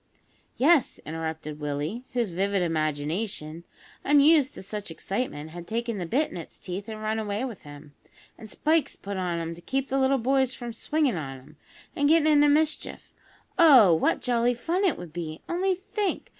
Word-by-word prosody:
"Yes," 295 +1 +3
interrupted 160 -1 -5
Willie, 150 - -3
whose 235 -6 0
vivid 195 +2 0
imagination, 155 +1 -2 0.4
unused 290 0 +5
to - - -9
such 205 0 -6
excitement, 165 -2 -4
had 175 0 -9
taken 230 -1 -2
the 175 - -4
bit 285 - 0
in - - -7
its 165 - -9
teeth 190 +4 -6
and 215 -1 -6
run 220 +1 -1
away 210 +3 -2
with 230 -8 -7
him; 145 0 -13 0.4
"an' 220 - -11
spikes 310 +7 0
put 200 0 -6
on 180 -2 -1
'em 165 0 -3
to 170 - -12
keep 270 +8 -2
the 270 - +1
little 270 +1 +3
boys 265 +1 +1
from 240 -2 -6
swinging 285 - 0
on 135 -4 -5
'em, 140 +4 -17 0.4
an' 285 - +2
gettin' 320 0 +5
into 295 -1 +5
mischief. 310 +1 0 0.5
Oh! 260 - +8
what 160 - +1
jolly 245 0 +2
fun 340 - -1
it 355 - +2
would 170 -3 -9
be. 160 -2 -6
Only 370 +2 0
think! 405 +1 -3
220 Hz, 180 wpm, -26 LUFS, 165-275 Hz, 0.5 s, Oh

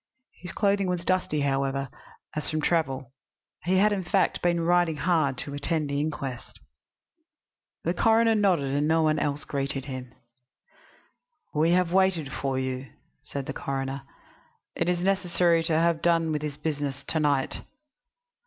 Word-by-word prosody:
His 180 -1 -7
clothing 200 -1 +1
was 180 -1 -2
dusty, 180 -5 +1
however, 135 0 0 0.5
as 150 - -3
from 155 - -1
travel. 135 -6 0 0.5
He 185 +2 +3
had, 210 +2 +4
in 195 -2 -2
fact, 190 +2 +1
been 175 -1 +2
riding 175 -1 +3
hard 155 -6 +1
to 140 - -5
attend 145 0 -1
the 140 - 0
inquest. 140 -4 -4 1.2
The 170 - 0
coroner 225 +3 +4
nodded; 165 -10 +2
no 160 +1 +3
one 155 0 +2
else 145 0 -1
greeted 135 -1 -2
him. 130 -3 -6 1.4
"We 160 +3 +3
have 180 -1 +2
waited 185 -7 +2
for 135 -1 -2
you," 130 0 -3 0.3
said 140 -1 -6
the - - -4
coroner. 135 0 -3 0.7
"It - - 0
is 175 -1 0
necessary 175 -3 +2
to 165 - +1
have 165 0 +2
done 165 -2 +2
with 150 -1 -1
this 150 -2 -4
business 145 -3 -3
to 160 - +1
night." 145 -3 +1
155 Hz, 150 wpm, -27 LUFS, 140-175 Hz, 1.4 s, had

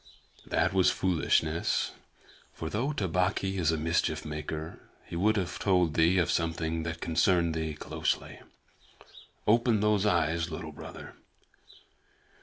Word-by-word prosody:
"That - - +1
was 95 -2 +4
foolishness, 80 -2 +1 0.6
for 80 0 -5
though 125 - 0
Tabaqui 95 - 0
is 80 -2 +2
a 80 - 0
mischief 80 0 0
maker, 75 +1 -5 0.3
he - - -8
would 105 +5 +2
have 90 -3 -2
told 90 -5 +2
thee 85 +4 +4
of 85 -2 +2
something 80 -1 -1
that 85 0 -5
concerned 85 0 +2
thee 80 -1 -3
closely. - - -3 1.1
Open 115 0 +3
those 105 -1 +2
eyes, 85 -3 +1
Little 80 0 -6
Brother. 75 - -10
85 Hz, 125 wpm, -29 LUFS, 80-95 Hz, 1.1 s, was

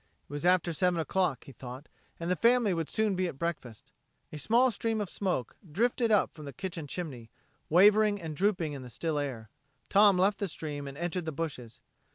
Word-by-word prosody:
It - - -12
was 145 +4 -1
after 180 -2 +3
seven 180 +1 +1
o'clock, 165 -4 0
he - - -12
thought, 130 +3 -9 0.3
and 170 +2 -2
the - - +3
family 235 -2 +3
would 165 -2 -2
soon 215 -2 +1
be 185 0 0
at 135 - -6
breakfast. 135 -9 -5 0.4
A 150 - -5
small 240 - +3
stream 225 +1 -1
of 205 -3 -3
smoke 180 - -2 0.2
drifted 235 - +1
up 210 - +3
from 155 - -10
the 140 - -7
kitchen 170 -5 -5
chimney, 135 -9 -6 0.4
wavering 205 +4 +5
and 160 -3 -6
drooping 180 -4 0
in 140 - -6
the 125 - -9
still 155 +4 -2
air. 125 -7 -5 0.4
Tom 200 -1 +6
left 195 +3 +2
the 200 - -1
stream 145 -4 -5
and 140 0 -8
entered 175 +1 -2
the 160 - -2
bushes. 140 -7 -5
170 Hz, 205 wpm, -30 LUFS, 145-200 Hz, 0.4 s, Tom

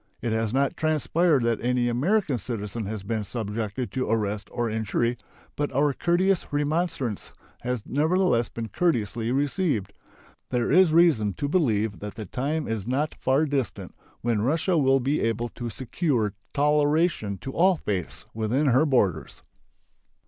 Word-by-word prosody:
It 115 - -2
has 110 -1 0
not 140 +6 +1
transpired 155 -2 +2
that 115 -1 0
any 125 0 +1
American 140 - +1
citizen 105 0 -4
has 105 -2 -5
been 110 +1 -2
subjected 110 +2 -4
to 130 -4 -2
arrest 105 -2 -1
or 120 -1 -1
injury, 110 +2 0 0.4
but 145 0 -2
our 145 +2 +2
courteous 180 +5 +1
remonstrance 145 - -1 0.3
has 125 -3 -3
nevertheless 155 -4 +2
been 115 -1 -6
courteously 115 - 0
received. 140 - 0 0.6
There 120 -1 0
is 180 +1 +6
reason 155 - +4
to 145 - -3
believe 110 - +1
that 105 0 -7
the 110 -2 -6
time 145 - -2
is 110 -2 -3
not 145 +5 0
far 135 +4 +1
distant 140 -4 -3 0.3
when 115 -3 0
Russia 160 - +1
will 135 -3 +4
be 140 +4 0
able 115 +1 -1
to 120 0 -6
secure 120 - -1 0.2
toleration 150 - +2
to 135 - -7
all 185 +6 +4
faiths 95 - -4
within 120 +7 +1
her 130 +6 +4
borders. 95 - 0
125 Hz, 150 wpm, -26 LUFS, 110-150 Hz, 0.6 s, is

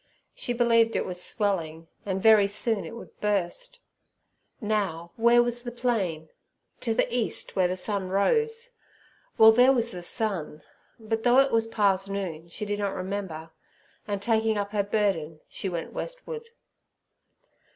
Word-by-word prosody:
She - - -4
believed 230 -1 +3
it - - 0
was 180 0 -3
swelling, 165 -6 -1 0.2
and 190 -1 -2
very 215 -3 +6
soon 210 +1 +1
it 230 - -8
would 235 - -12
burst. 210 - -2 0.8
Now, 195 -7 -2
where 235 +1 +5
was 240 0 -2
the 240 - -5
plain? 195 -11 -2 0.5
To 225 -2 -1
the - - +3
east, 240 -3 -2
where 185 -2 +3
the 185 +1 -3
sun 190 0 -2
rose. 455 - +1 0.7
Well, 220 0 +9
there 250 +4 +6
was 235 -3 +2
the 180 - -6
sun; 175 -6 -2 0.4
but 225 0 -2
though 245 +2 +4
it 270 0 +5
was 225 0 +2
past 195 -3 +1
noon, 175 -5 -4
she 210 +5 -5
did 205 0 -3
not 200 -1 -2
remember, 185 -4 -5 0.6
and, 200 -1 -3
taking 220 -1 +1
up 200 0 -2
her 210 -1 +1
burden, 195 -7 -1
she 195 - -4
went 170 -2 -5
westward. 480 -2 -6
205 Hz, 155 wpm, -26 LUFS, 185-235 Hz, 0.8 s, Well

